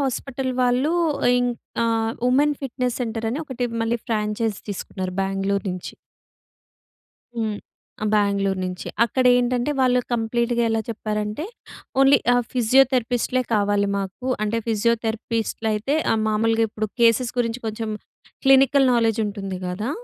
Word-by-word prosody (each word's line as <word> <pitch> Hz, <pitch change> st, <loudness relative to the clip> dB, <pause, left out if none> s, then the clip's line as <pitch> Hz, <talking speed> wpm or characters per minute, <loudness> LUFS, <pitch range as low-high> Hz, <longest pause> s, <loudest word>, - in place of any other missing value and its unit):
Hospital 265 Hz, -1 st, -2 dB
వాళ్ళు 250 Hz, +6 st, +2 dB, 0.5 s
ఇంక్ 245 Hz, -1 st, -1 dB, 0.3 s
ఆహ్, 225 Hz, 0 st, 0 dB, 0.2 s
women 290 Hz, +3 st, +3 dB
fitness 250 Hz, -1 st, -2 dB
centre 225 Hz, -1 st, -3 dB
అని 270 Hz, +6 st, -3 dB
ఒకటి 255 Hz, -4 st, -3 dB, 0.2 s
మళ్ళీ 230 Hz, +1 st, 0 dB
ఫ్రాంచైజ్ 210 Hz, -1 st, -1 dB
తీసుకున్నారు. 185 Hz, -1 st, -5 dB
బెంగుళూరు 195 Hz, +1 st, -1 dB
నుంచి. 180 Hz, -1 st, -6 dB, 1.4 s
హ్మ్, 220 Hz, -2 st, -1 dB, 0.5 s
ఆ! -, -, 0 dB
బెంగుళూరు 200 Hz, -2 st, +1 dB
నుంచే 180 Hz, 0 st, -5 dB, 0.2 s
అక్కడ 255 Hz, +3 st, 0 dB
ఏంటంటే, 245 Hz, +2 st, +1 dB
వాళ్ళు 250 Hz, -1 st, +3 dB
కంప్లీట్‌గా 235 Hz, +1 st, 0 dB
ఎలా 225 Hz, -, +1 dB
చెప్పారంటే, 215 Hz, +4 st, -3 dB, 0.6 s
ఓన్లీ 270 Hz, 0 st, +6 dB, 0.2 s
ఆహ్, 245 Hz, -, +3 dB
ఫిజియోథెరపిస్ట్‌లే 255 Hz, 0 st, +2 dB
కావాలి 205 Hz, -1 st, +2 dB
మాకు. 195 Hz, +6 st, -5 dB, 0.2 s
అంటే 220 Hz, +2 st, 0 dB
ఫిజియోథెరపిస్ట్లయితే 225 Hz, +2 st, -1 dB, 0.2 s
ఆహ్, 220 Hz, -, +1 dB
మామూలుగా 225 Hz, +1 st, +2 dB
ఇప్పుడు 215 Hz, +1 st, -3 dB
కేసెస్ 235 Hz, +1 st, +4 dB
గురించి 235 Hz, 0 st, -1 dB
కొంచెం 220 Hz, 0 st, -3 dB, 0.5 s
క్లినికల్ 270 Hz, 0 st, +5 dB
నాలెడ్జ్ 225 Hz, -2 st, +2 dB
ఉంటుంది 195 Hz, -2 st, -5 dB
కదా! 200 Hz, +7 st, -3 dB
230 Hz, 125 wpm, -23 LUFS, 210-250 Hz, 1.4 s, ఓన్లీ